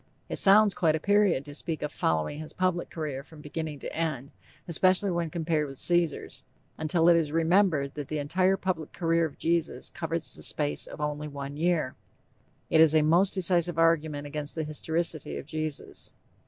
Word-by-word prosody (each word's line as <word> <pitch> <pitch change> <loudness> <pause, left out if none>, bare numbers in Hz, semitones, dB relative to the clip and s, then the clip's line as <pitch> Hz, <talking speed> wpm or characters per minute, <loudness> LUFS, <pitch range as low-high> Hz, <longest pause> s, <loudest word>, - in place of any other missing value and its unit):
It - - -1
sounds 205 +1 +6
quite 160 -3 +2
a - - -2
period 200 -6 +2
to 145 - -9
speak 160 +2 -5
of 150 - -3
"following 80 - -1
his 155 0 -8
public 185 -2 -1
career" 150 -5 -4
from 155 +2 -15
beginning 150 0 -5
to - - -6
end, 155 -4 -3 0.4
especially 185 +3 +3
when 170 -2 -1
compared 160 -2 -1
with 135 -1 -10
Caesar's, 175 -1 +1 0.3
until 165 +1 +1
it 175 - +7
is 160 -3 +1
remembered 165 -3 +2
that 145 -2 -6
the 155 - -3
entire 185 +6 +1
public 180 -5 -3
career 165 -2 +1
of 155 - -7
Jesus 165 -1 -1
covers 165 0 -3
the - - -11
space 145 -1 -1
of - - -10
only 150 0 -3
one 140 -1 -7
year. 160 -4 0 0.8
This 160 - +6
is 160 -1 +6
a 155 - +5
most 175 +6 +3
decisive 175 -2 +3
argument 160 -3 +2
against 145 0 -4
the 160 - -2
historicity 155 - -2
of 70 - -7
Jesus. 155 -2 -5
160 Hz, 180 wpm, -28 LUFS, 150-175 Hz, 0.8 s, it